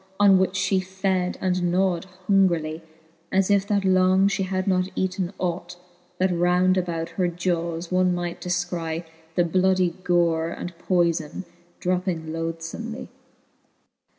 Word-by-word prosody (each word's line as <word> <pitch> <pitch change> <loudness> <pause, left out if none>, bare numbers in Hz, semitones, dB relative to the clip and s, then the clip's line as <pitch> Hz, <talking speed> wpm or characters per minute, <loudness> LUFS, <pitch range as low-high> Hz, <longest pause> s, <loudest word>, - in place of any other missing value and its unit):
On 195 -2 +6
which 190 0 +1
(he 190 0 +2
fed, 185 -1 -1
and 180 -2 +1
gnawed 185 -1 +1 0.2
hungrily, 170 -5 +2 0.5
As 190 +1 +2
if 200 0 +3
that 200 -2 +1
long 185 +1 +4
fhe 200 -1 -1
had 185 0 -2
not 185 -1 +2
eaten 185 -1 -1
ought; 175 0 -3 0.4
That 185 -1 +1
round 180 +2 +3
about 170 -3 -2
her 180 +2 0
jawes 170 -1 -2
one 185 -1 +3
might 175 -1 -4
defcry 175 -2 -2 0.3
The 175 - +4
bloudie 185 0 +2
gore 170 -2 +2
and 175 +1 -6
poyfon 170 -2 0 0.4
dropping 180 -3 -1
lothlbmely. 165 +8 -5
180 Hz, 130 wpm, -24 LUFS, 170-190 Hz, 0.5 s, On